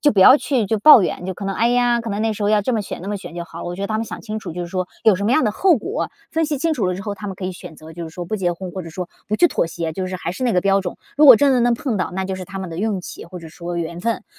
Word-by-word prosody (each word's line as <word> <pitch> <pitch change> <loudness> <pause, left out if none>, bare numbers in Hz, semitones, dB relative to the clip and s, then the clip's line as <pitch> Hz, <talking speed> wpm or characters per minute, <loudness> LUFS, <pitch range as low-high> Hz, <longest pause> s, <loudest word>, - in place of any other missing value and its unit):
就 295 - +4
不 200 - -1
要 255 +9 +9
去 255 -8 0
就 220 +1 0
抱 300 -3 +9
怨。 180 - -3
就 190 - -3
可 200 - -7
能： 195 0 -2
“哎 230 +1 +2
呀， 245 -1 +2
可 230 -1 -5
能 205 - -2
那 225 - +1
时 210 0 -6
候 205 - +2
要 210 -1 +4
这 250 +5 -1
么 220 - 0
选、 195 - -7
那 190 - -6
么 205 - -2
选 190 - -10
就 170 - -4
好 170 - -11
了。 - - -6
“我 175 - -6
觉 195 - -5
得 200 - -1
他 215 +1 -2
们 225 - -1
想 - - -7
清 215 -1 -5
楚 170 - -7
就 180 - -5
是 - - -5
说 185 0 -3 0.2
有 220 - +6
什 200 - -4
么 225 - +1
样 260 +1 +3
的 215 - +1
后 360 - +3
果， 390 - -3 0.2
分 325 0 +1
析 300 -2 -2
清 325 +2 0
楚 210 -9 0
了 180 - -1
之 195 - -6
后， 205 -1 -4
他 205 0 -7
们 190 - -6
可 190 - -6
以 185 - -3
选 175 -2 -11
择 160 +1 -12
就 170 - -7
是 160 - -7
说 175 0 -6
不 195 - -4
结 180 -4 0
婚， 180 0 -7
或 190 - -5
者 165 - -9
说 180 +2 -5 0.2
不 215 - 0
去 350 - +6
妥 - - 0
协， 165 -1 -4
就 185 +2 -3
是 185 - -4
还 170 -1 -4
是 225 - -7
那 245 - +2
个 180 - +3
标 195 0 +2
准。 180 -2 -5 0.2
如 300 - +5
果 260 -5 +11
真 280 +4 +4
的 250 - +3
能 240 0 +3
碰 240 -2 -2
到， 185 - -1
那 190 +1 -2
就 190 - -3
是 185 0 -6
他 195 +1 -8
们 190 -2 -5
的 165 - -7
运 205 -2 -1
气， - - -9
或 180 +2 -9
者 165 -2 -10
说 170 +2 -6
缘 170 0 -4
分。 230 +4 -2
195 Hz, 415 characters per minute, -20 LUFS, 180-230 Hz, 0.2 s, 果